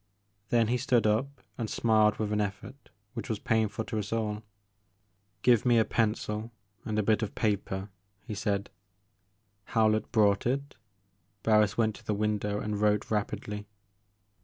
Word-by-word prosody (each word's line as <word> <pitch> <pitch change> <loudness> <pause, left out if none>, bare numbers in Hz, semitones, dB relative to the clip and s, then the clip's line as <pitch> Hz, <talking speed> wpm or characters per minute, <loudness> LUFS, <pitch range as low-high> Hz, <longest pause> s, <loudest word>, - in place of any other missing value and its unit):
Then 115 -2 +3
he 125 - +2
stood 125 -3 +2
up, 130 +6 0 0.2
and 115 -2 -2
smiled 110 -2 +3
with 105 -1 -1
an 105 - +1
e£fort 100 +4 -3 0.4
which - - -6
was 110 - 0
painful 110 +1 0
to 110 -3 -3
us 105 -1 -5
all. 105 -2 -1 0.4
' 100 -1 -44
* 95 0 -44
Give 120 -4 +5
me 120 -1 +4
a 110 - +4
pencil 110 0 -1 0.3
and 110 -1 -3
a 105 - +2
bit 110 +1 +2
of 110 - -3
paper, 100 -2 -1 0.2
" 100 0 -40
he 110 - -4
said. 100 -1 -2 1.1
Howlett 110 -1 +3
brought 105 -2 +3
it. 140 +3 -2 0.7
Barris 105 -2 +3
went 110 -2 +2
to - - -16
the 105 - -1
window 105 0 -1
and 105 -1 -3
wrote 105 0 +2
rapidly. 105 0 -3
105 Hz, 165 wpm, -29 LUFS, 105-110 Hz, 1.1 s, Give